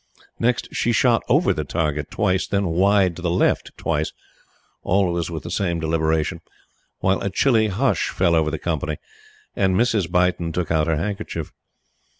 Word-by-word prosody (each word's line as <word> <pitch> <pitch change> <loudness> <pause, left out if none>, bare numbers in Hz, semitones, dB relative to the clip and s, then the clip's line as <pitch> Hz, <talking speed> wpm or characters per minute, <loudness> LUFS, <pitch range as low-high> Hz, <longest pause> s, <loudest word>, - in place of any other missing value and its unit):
Next, 120 +1 +1
she 120 - +1
shot 115 0 +3
over 145 - +3
the 75 -3 -3
target 75 -1 -2
twice, 95 -3 0
then 100 0 0
wide 95 +1 +3
to - - -8
the 90 - -1
left 90 +2 0
twice 75 +1 -1 0.7
always 90 -3 +1
with 80 -2 -5
the 85 - -6
same 90 -3 -1
deliberation 80 -1 0 0.6
while 95 +1 +1
a 100 - -1
chilly 110 +2 +3
hush 115 +7 0
fell 85 - +1
over 80 -2 +2
the 80 - -3
company, 75 -2 -2 0.6
and 95 -1 +2
Mrs. 105 -6 +1
Beighton 90 -2 +1
took 90 -1 -2
out 80 -1 +2
her 80 -2 +1
handkerchief. 100 -3 -4
90 Hz, 160 wpm, -22 LUFS, 80-100 Hz, 0.7 s, shot